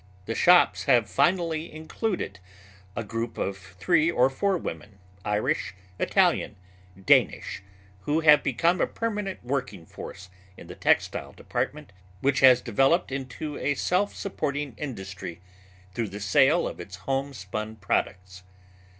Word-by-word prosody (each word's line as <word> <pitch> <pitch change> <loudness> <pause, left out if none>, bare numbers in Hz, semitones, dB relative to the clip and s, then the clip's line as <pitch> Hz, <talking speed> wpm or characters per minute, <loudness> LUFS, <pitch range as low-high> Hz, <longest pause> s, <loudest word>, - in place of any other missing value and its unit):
The 115 - -2
shops 115 - +5
have 120 -4 +4
finally 170 - +1
included 160 - -4 0.6
a 115 - -2
group 115 +1 -4
of 100 - -2
three 100 - +1
or 130 -5 +3
four 195 +7 +1
women, 100 - -7 0.3
Irish, 105 -3 -1 0.2
Italian, - - +2 0.4
Danish, 95 - +2 0.4
who 150 - 0
have 150 -2 +7
become 165 +8 +1
a - - +2
permanent 210 -4 -4
working 125 -10 -3
force 90 +2 -10 0.3
in - - -11
the - - -9
textile - - 0
department - - -4 0.3
which 135 +3 +1
has 130 -2 +7
developed 135 - +2
into 140 +3 -5
a 145 - 0
self 185 +8 0
supporting 145 -8 -3
industry 95 - -7 0.5
through 115 0 -2
the 100 +2 -7
sale 135 - +3
of - - -7
its 90 +2 -8
homespun 110 -4 -4
products. 95 -2 -2
130 Hz, 130 wpm, -26 LUFS, 100-155 Hz, 0.6 s, have